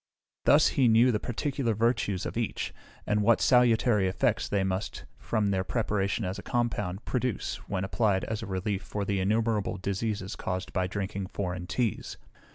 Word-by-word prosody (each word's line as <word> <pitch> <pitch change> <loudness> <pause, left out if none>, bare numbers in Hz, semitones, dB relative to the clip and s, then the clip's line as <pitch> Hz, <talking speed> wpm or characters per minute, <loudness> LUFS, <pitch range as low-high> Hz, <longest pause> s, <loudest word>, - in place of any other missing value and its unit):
Thus 150 +2 +6
he 130 -4 +3
knew 115 +3 +5
the 105 - 0
particular 125 -1 -1
virtues 110 -4 0
of - - -4
each, - - -2 0.3
and 105 0 +1
what 115 +2 +4
salutary 120 -5 +4
effects 110 +5 0
they 100 -2 +1
must, 95 +1 -3
from 105 -2 0
their 95 -1 +1
preparation 105 -1 -1
as 90 +1 -3
a - - -6
compound, 110 -4 -2
produce 125 -4 -2
when 95 -2 -1
applied 95 -1 +1
as 110 -1 -3
a - - -6
relief 95 +1 -2
for 105 -1 -4
the 100 0 0
innumerable 110 +1 +1
diseases 100 +1 -3
caused 90 0 -4
by 95 0 +1
drinking 95 0 -3
foreign 90 -2 -4
teas. 120 0 -2
105 Hz, 165 wpm, -28 LUFS, 95-115 Hz, 0.3 s, Thus